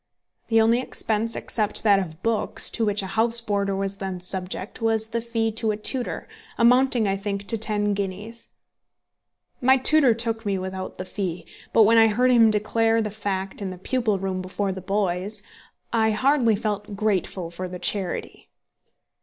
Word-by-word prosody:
The 225 -1 +3
only 225 +2 +4
expense, 225 -2 -2
except 215 -3 -1
that 205 -3 +5
of 170 -2 -6
books, 230 -1 0
to 230 - -1
which 205 -1 +1
a 190 - -6
house 230 +1 +3
boarder 200 -3 -1
was 195 0 -3
then 190 -2 -4
subject, 185 +4 -5
was 225 -1 0
the 230 0 -2
fee 225 -1 -1
to 225 0 -1
a 210 - 0
tutor, 245 +3 -3 0.3
amounting, 245 -1 +4
I 195 - +1
think, 200 0 -4
to 230 - +3
ten 210 -1 +1
guineas. 200 +4 -5 1.1
My 260 +1 +5
tutor 265 -2 +5
took 225 -1 -2
me 200 -2 -1
without 185 0 -6
the 185 - -5
fee; 185 -3 -4 0.3
but 225 - +6
when 225 +2 +5
I 225 - +7
heard 250 +4 +2
him 230 -2 +6
declare 225 +2 +1
the 215 -2 -2
fact 195 -2 -4
in 195 - -3
the 185 - -7
pupil 220 +1 0
room 190 -1 -3
before 190 +2 -2
the 190 0 -6
boys, 195 +1 -2 0.5
I 220 -1 +3
hardly 240 0 +3
felt 210 0 -3
grateful 195 -4 -1
for 185 +2 -5
the 180 0 -7
charity. 190 0 -3
210 Hz, 175 wpm, -24 LUFS, 195-225 Hz, 1.1 s, I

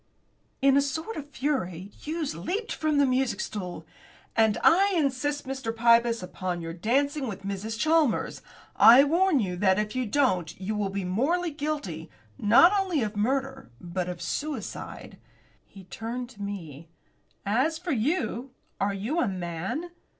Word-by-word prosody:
In 275 -1 +6
a 280 - +5
sort 320 +10 -3
of 290 -1 -7
fury 200 - -2
Hughes 315 - -4
leaped 385 - -3
from 310 -2 0
the 285 - +5
music 255 -5 0
stool. 185 -5 -5 0.5
"And 220 -2 +3
I 390 +3 +5
insist, 290 0 0
Mr. 265 -3 -3
Pybus, 230 -1 +3
upon 180 -1 -4
your 165 0 -5
dancing 270 - 0
with 200 -3 -6
Mrs. 200 +3 -4
Chalmers. 310 -1 +1 0.3
I 245 +4 +9
warn 335 +1 +3
you 185 -5 -1
that 190 0 +3
if 210 +2 -2
you 255 -2 -1
don't 205 - 0
you 195 +3 -3
will 210 -2 -1
be 195 -1 -3
morally 310 - 0
guilty, 285 - -4 0.3
not 240 - +6
only 360 -9 0
of 210 0 -4
murder, 265 - -1
but 180 +1 -4
of 175 -1 -6
suicide." 290 -8 -5 0.5
He 195 - -13
turned 230 +6 -6
to 205 -5 -13
me. 165 -6 -7 0.6
"As 260 +11 +1
for 350 +1 -4
you 250 -1 -1 0.2
are 200 0 0
you 230 - -2
a 255 - +2
man? 190 - -4
235 Hz, 155 wpm, -27 LUFS, 195-290 Hz, 0.6 s, I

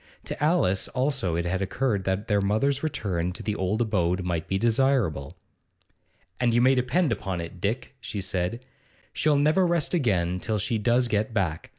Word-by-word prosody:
To - - -4
Alice 150 - +2
also 130 - -1
it 85 +1 -1
had 95 +2 -1
occurred 100 0 -1
that 95 +2 -1
their 105 -2 +2
mother's 120 +8 +1
return 95 - -2
to - - -8
the 105 - -1
old 105 +4 0
abode 90 -4 0
might 85 -3 -2
be 95 - 0
desirable. 110 - +1 1.0
'And 120 -2 +2
you - - +5
may 130 +2 +5
depend 135 +6 +1
upon 95 -2 -2
it, 85 +1 -8
Dick,' 120 +6 -2
she 110 -4 -5
said, 95 +5 -2 0.5
'she'll 155 -1 +2
never 155 +6 +3
rest 170 -2 0
again 90 - +1
till 110 +2 -1
she 110 +2 -1
does 120 +3 +2
get 110 0 -1
back. 85 -6 -1
105 Hz, 180 wpm, -26 LUFS, 90-130 Hz, 1.0 s, you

